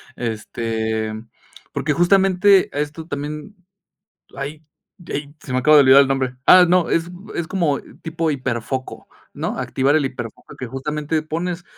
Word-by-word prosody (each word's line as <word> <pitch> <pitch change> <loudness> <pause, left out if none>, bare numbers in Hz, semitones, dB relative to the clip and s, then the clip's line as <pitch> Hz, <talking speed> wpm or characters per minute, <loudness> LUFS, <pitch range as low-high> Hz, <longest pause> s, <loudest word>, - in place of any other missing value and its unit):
este, 110 -1 -3 0.6
porque 150 0 -1
justamente 190 +2 +4
esto 150 +2 -4
también, 150 +6 -6 0.8
ay, 150 +3 -6 0.4
ey, 145 0 -5
se 130 - -7
me 130 - +1
acaba 150 +4 +5
de 145 - +8
olvidar 135 +1 +7
el 135 - -1
nombre, 130 -2 -1
ah, 180 -1 +8
no, 180 -1 +3
es 165 +1 0 0.2
es 170 - -2
como 165 -7 0 0.2
tipo 160 0 -2
hiperfoco, 130 -1 -4 0.2
¿no?, - - -4
activar 135 +3 +1
el 150 - +1
hiperfoco 120 -4 -7
que 130 - -5
justamente 150 +5 -3
pones 170 +3 -4
145 Hz, 145 wpm, -20 LUFS, 130-165 Hz, 0.8 s, de